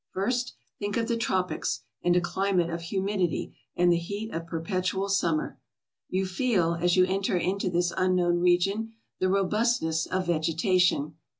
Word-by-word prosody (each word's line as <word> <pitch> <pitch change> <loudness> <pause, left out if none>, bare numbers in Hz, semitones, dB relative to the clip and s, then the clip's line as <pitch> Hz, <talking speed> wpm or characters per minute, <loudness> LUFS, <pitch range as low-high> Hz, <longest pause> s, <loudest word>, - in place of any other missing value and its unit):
First, 245 +6 -1 0.2
think 205 +1 -2
of 230 -1 0
the 235 - +1
tropics 185 - -1 0.2
and 175 0 +3
a 180 - +4
climate 180 -1 0
of 170 0 -4
humidity 190 +1 -1 0.2
and 175 0 +4
the 170 - +4
heat 205 +6 -5
of 165 0 -4
perpetual 185 +3 -2
summer. 170 -6 0 0.5
You 190 +1 0
feel, 185 -4 +1
as 175 +2 +1
you 185 - +6
enter 190 0 0
into 185 +2 -1
this 175 0 0
unknown 180 -2 +2
region, 195 +6 +1 0.3
the 185 - +2
robustness 195 -4 +1
of 185 0 -1
vegetation. 165 -1 +1
185 Hz, 155 wpm, -27 LUFS, 170-200 Hz, 0.5 s, you